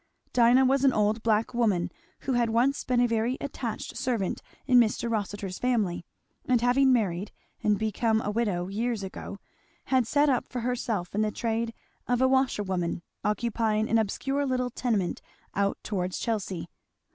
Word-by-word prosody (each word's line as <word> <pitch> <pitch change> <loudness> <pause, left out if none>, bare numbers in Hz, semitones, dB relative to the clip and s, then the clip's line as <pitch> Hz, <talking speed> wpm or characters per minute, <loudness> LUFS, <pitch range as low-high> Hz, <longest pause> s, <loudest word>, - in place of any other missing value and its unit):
Dinah 245 +2 +5
was 270 +1 +3
an 270 -2 +5
old 215 +1 +1
black 220 0 +1
woman 210 -8 +1 0.3
who 270 - -1 0.2
once 250 +5 +2
had - - -13
been 250 -1 +2
a 245 - +4
very 230 +3 0
attached 245 -5 -5
servant 240 -6 -1 0.2
in 250 -2 +6
Mr. 235 0 +2
Rossitur's 205 -3 -3
family, 215 -9 0 0.4
and 250 -2 +4
having 255 +3 +4
married 200 -5 0 0.3
and 210 -1 +2
become 220 +1 +1
a 210 - -2
widow 205 -6 0
years 220 +2 -2
ago, 190 +1 -7 0.6
had 255 -3 +4
set 290 +3 +3
up 260 -4 +1
for 250 - -4
herself 230 -6 -2
in 210 - +1
the 215 - +2
trade 230 +1 -2 0.4
of 245 -1 +1
a 260 - +4
washerwoman, 195 -10 0 0.2
occupying 220 0 0
an 230 - +3
obscure 270 +7 -1
little 250 -2 -1
tenement 220 -8 -1 0.3
out 200 0 0
towards 185 -3 -2
Chelsea. 190 -7 -2
230 Hz, 160 wpm, -27 LUFS, 205-250 Hz, 0.6 s, in